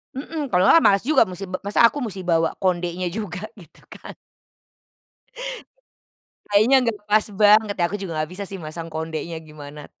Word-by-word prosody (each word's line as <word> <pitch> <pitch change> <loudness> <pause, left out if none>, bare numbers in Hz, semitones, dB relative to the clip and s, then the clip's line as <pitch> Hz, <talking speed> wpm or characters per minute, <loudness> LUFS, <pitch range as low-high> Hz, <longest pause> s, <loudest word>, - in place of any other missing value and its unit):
Mhm, 290 0 -5
kalau 180 0 +3
enggak 330 +10 +6
males 200 +1 +4
juga 310 - +4
musi 190 -2 -1
ba 185 0 -6
masa 205 +3 +3
aku 290 +4 +1
musti 195 -6 -5
bawa 165 -2 +1
kondenya 180 -1 -1
juga 205 -2 -5
gitu 185 -7 -18
kan? - - -11 2.3
Kayaknya 215 +6 +4
enggak 230 -4 -1
pas 210 +1 +2
banget 210 0 +4
ya, 175 - -1
aku 200 +5 -3
juga 190 -4 -6
nggak 155 - -7
bisa 200 +2 -6
sih 195 - -6
masang 165 0 -7
kondenya 160 +1 -5
gimana, 150 -1 -11
190 Hz, 170 wpm, -22 LUFS, 170-215 Hz, 2.3 s, enggak